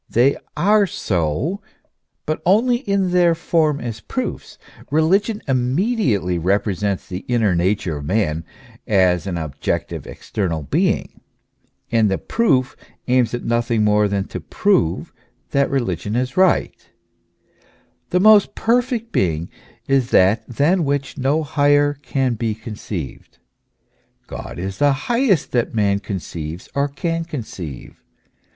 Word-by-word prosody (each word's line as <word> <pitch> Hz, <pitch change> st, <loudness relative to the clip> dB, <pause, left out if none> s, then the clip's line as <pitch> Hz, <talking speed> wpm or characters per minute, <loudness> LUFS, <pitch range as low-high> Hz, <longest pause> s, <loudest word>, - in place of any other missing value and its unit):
They 130 Hz, +4 st, +3 dB, 0.2 s
are 205 Hz, +4 st, +4 dB
so; 100 Hz, -, -1 dB, 0.6 s
but 155 Hz, -, -2 dB
only 230 Hz, +7 st, +3 dB
in 200 Hz, -6 st, 0 dB
their 175 Hz, -2 st, +4 dB
form 160 Hz, -3 st, +1 dB
as 115 Hz, -2 st, -5 dB
proofs. -, -, -5 dB, 0.3 s
Religion 195 Hz, -, +2 dB
immediately 130 Hz, -, +1 dB
repre 100 Hz, +3 st, +1 dB
sents 100 Hz, +1 st, -2 dB
the 90 Hz, -, -5 dB
inner 115 Hz, -6 st, +2 dB
nature 85 Hz, -2 st, 0 dB
of 70 Hz, -, -7 dB
man 80 Hz, -3 st, 0 dB, 0.4 s
as 95 Hz, -3 st, +2 dB
an 90 Hz, -3 st, -2 dB
objective, 75 Hz, -4 st, -3 dB
external 85 Hz, -7 st, -3 dB
being. -, -, -1 dB, 0.7 s
And 110 Hz, -2 st, +3 dB
the 95 Hz, -, 0 dB
proof 140 Hz, -, +1 dB, 0.3 s
aims 125 Hz, -1 st, +2 dB
at 120 Hz, -, -6 dB
nothing 115 Hz, -1 st, +1 dB
more 105 Hz, 0 st, +3 dB
than 100 Hz, -1 st, -1 dB
to -, -, -5 dB
prove 190 Hz, -, 0 dB, 0.4 s
that 140 Hz, 0 st, +2 dB
religion 105 Hz, -6 st, -2 dB
is 125 Hz, +1 st, -1 dB
right. 185 Hz, -1 st, +1 dB, 1.2 s
The 180 Hz, -, +2 dB
most 210 Hz, +1 st, +6 dB
perfect 235 Hz, 0 st, 0 dB
being 85 Hz, -2 st, 0 dB, 0.4 s
is 135 Hz, -3 st, +2 dB
that 95 Hz, +2 st, +3 dB
than 155 Hz, +9 st, +2 dB
which 140 Hz, -1 st, -2 dB
no 140 Hz, +4 st, +1 dB
higher 145 Hz, 0 st, +3 dB
can 135 Hz, -2 st, -1 dB
be 110 Hz, -1 st, -2 dB
conceived: 105 Hz, -, -7 dB, 0.9 s
God -, -, -8 dB
is 95 Hz, +2 st, -5 dB
the 145 Hz, -1 st, +4 dB
highest 230 Hz, -, +1 dB
that 120 Hz, -2 st, 0 dB
man 100 Hz, -2 st, +2 dB
conceives 85 Hz, -3 st, -6 dB
or 140 Hz, +1 st, +1 dB
can 165 Hz, +4 st, -2 dB
conceive. 105 Hz, -, -8 dB
125 Hz, 130 wpm, -20 LUFS, 95-160 Hz, 1.2 s, most